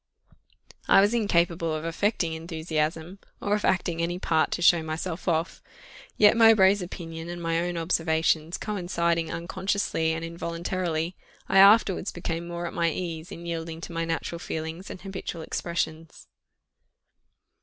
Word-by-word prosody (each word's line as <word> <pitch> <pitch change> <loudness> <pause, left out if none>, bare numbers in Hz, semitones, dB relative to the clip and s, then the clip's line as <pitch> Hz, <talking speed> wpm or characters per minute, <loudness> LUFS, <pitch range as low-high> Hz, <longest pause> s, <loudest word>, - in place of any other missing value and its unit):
I - - +7
was 205 +3 +4
incapable 170 -7 +1
of 155 +1 -5
affecting 170 0 0
enthusiasm, 160 +2 -3 0.2
or 205 - -1
of 210 - 0
acting 175 -3 +1
any 175 +1 -1
part 160 -3 +1
to - - -3
show 170 -1 +6
myself 160 +3 -5
off; 165 0 0 0.6
yet 210 +1 +6
Mowbray's 210 -4 +6
opinion 165 -2 -7
and 175 0 -5
my 165 -1 0
own 175 0 -2
observations 160 -1 +1
coinciding, 170 -5 -1
unconsciously 180 -1 -1
and 165 +1 -4
involuntarily, 170 0 -3 0.3
I 195 - +4
afterwards 200 -1 +5
became 170 -1 -4
more 175 0 -4
at - - -5
my 170 -1 +1
ease 165 0 -5
in 170 - -8
yielding 165 -1 -4
to 170 - -7
my 165 0 -1
natural 165 +1 -3
feelings 160 +3 -5
and - - -7
habitual 190 -4 -6
expressions. 165 -1 -4
170 Hz, 145 wpm, -26 LUFS, 165-185 Hz, 0.6 s, I